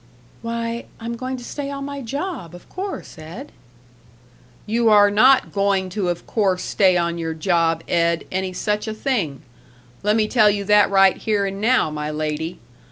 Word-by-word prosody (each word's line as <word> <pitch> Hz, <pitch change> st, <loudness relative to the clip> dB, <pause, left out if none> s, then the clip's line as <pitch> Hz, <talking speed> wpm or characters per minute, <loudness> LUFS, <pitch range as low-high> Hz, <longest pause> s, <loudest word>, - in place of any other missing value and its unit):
"Why, 230 Hz, 0 st, -4 dB
I'm 235 Hz, +1 st, -4 dB
going 255 Hz, +2 st, -4 dB
to 245 Hz, -, -10 dB
stay 280 Hz, +3 st, -5 dB
on 275 Hz, 0 st, -5 dB
my 280 Hz, 0 st, -6 dB
job, 270 Hz, -, -5 dB
of 175 Hz, -, -14 dB
course, 380 Hz, -, -6 dB
Ed." 175 Hz, -, -9 dB, 1.1 s
"You 230 Hz, +1 st, +2 dB
are 205 Hz, -1 st, +6 dB
not 255 Hz, +6 st, +5 dB
going 195 Hz, -2 st, +1 dB
to 190 Hz, -1 st, -2 dB
of 175 Hz, 0 st, -4 dB
course 195 Hz, -5 st, 0 dB
stay 185 Hz, -3 st, +3 dB
on 170 Hz, 0 st, -1 dB
your 165 Hz, -1 st, -3 dB
job 165 Hz, -1 st, +1 dB
Ed, 170 Hz, -1 st, +1 dB
any 190 Hz, 0 st, -2 dB
such 210 Hz, +4 st, -2 dB
a 220 Hz, -, -4 dB
thing. 205 Hz, -, -2 dB, 0.6 s
Lemme 215 Hz, +1 st, +2 dB
tell 215 Hz, -2 st, +4 dB
you 200 Hz, -1 st, -1 dB
that 210 Hz, 0 st, +4 dB
right 195 Hz, -1 st, +5 dB
here 210 Hz, -2 st, 0 dB
and 195 Hz, 0 st, -4 dB
now, 230 Hz, -7 st, +2 dB
my 150 Hz, 0 st, -4 dB
lady. 155 Hz, +2 st, -3 dB
205 Hz, 170 wpm, -21 LUFS, 175-235 Hz, 1.1 s, are